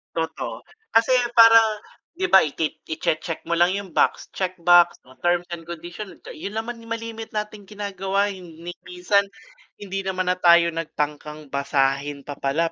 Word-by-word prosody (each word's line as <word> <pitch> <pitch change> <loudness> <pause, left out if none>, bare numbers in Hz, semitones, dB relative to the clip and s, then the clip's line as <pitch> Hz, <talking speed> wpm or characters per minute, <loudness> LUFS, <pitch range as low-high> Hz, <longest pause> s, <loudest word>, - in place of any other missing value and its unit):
Totoo, 160 -1 -4 0.3
kasi 225 +2 +4 0.2
parang 230 -1 +8 0.5
'di 375 +2 -2
ba, 190 - +9
ikit 155 0 -1 0.2
i-che-check 160 +1 -2
mo 170 - -7
lang 175 +2 +3
'yung 200 -2 -6
box, - - +1
check 185 -1 -3
box 175 0 +6
o 130 - -19
terms 175 +3 +1
and 170 -1 -7
condition, 175 +4 -8 0.2
'yun 200 +6 -7
naman 230 +2 -4
'yung 230 - -14
malimit 225 -1 -8
nating 210 -1 -5
ginagawa 200 -1 -2
'yung 185 -2 -10 0.2
ni 175 - -5 0.2
minsan 200 +3 +1 0.5
hindi 195 -1 -5
naman 185 -1 0
na 180 - -2
tayo 170 -1 +5
nagtangkang 150 -2 -5
basahin 140 0 0
pa 145 0 -8
pala 160 +5 0
175 Hz, 160 wpm, -23 LUFS, 160-205 Hz, 0.5 s, ba